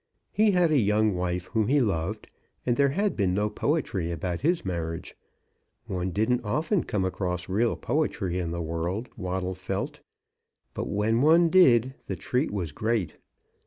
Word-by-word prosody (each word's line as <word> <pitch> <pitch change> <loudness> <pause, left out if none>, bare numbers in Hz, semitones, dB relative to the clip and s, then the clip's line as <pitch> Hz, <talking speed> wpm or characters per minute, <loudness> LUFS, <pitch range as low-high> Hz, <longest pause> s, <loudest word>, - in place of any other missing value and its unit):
He 215 +1 +3
had 180 -4 +3
a 150 - +4
young 105 -1 +2
wife 90 0 -2
whom 110 -2 +2
he 145 +4 +3
loved, 105 -2 -1 0.4
but 120 - +2
there 140 +1 +3
had 200 +8 0
been 95 -4 +1
no 105 +1 0
poetry 105 - -1
about 85 +1 -3
his 165 - +1
marriage. 85 -3 -4 0.7
One 90 -1 -2
didn't 110 +7 +1
often 155 - 0
come 95 -3 -1
across 90 -1 -2
real 110 +5 +1
poetry 100 - -1
in 85 -2 -2
the 85 0 -3
world, 85 +8 -3
Waddle 95 -1 -3
felt; 95 +1 -4 0.7
but - - -4
when 110 +3 +1
one 165 +3 +5
did, 130 -9 +5
the - - -2
treat 130 +2 -1
was 90 -7 -3
great. 110 +3 -1
105 Hz, 160 wpm, -27 LUFS, 90-130 Hz, 0.7 s, one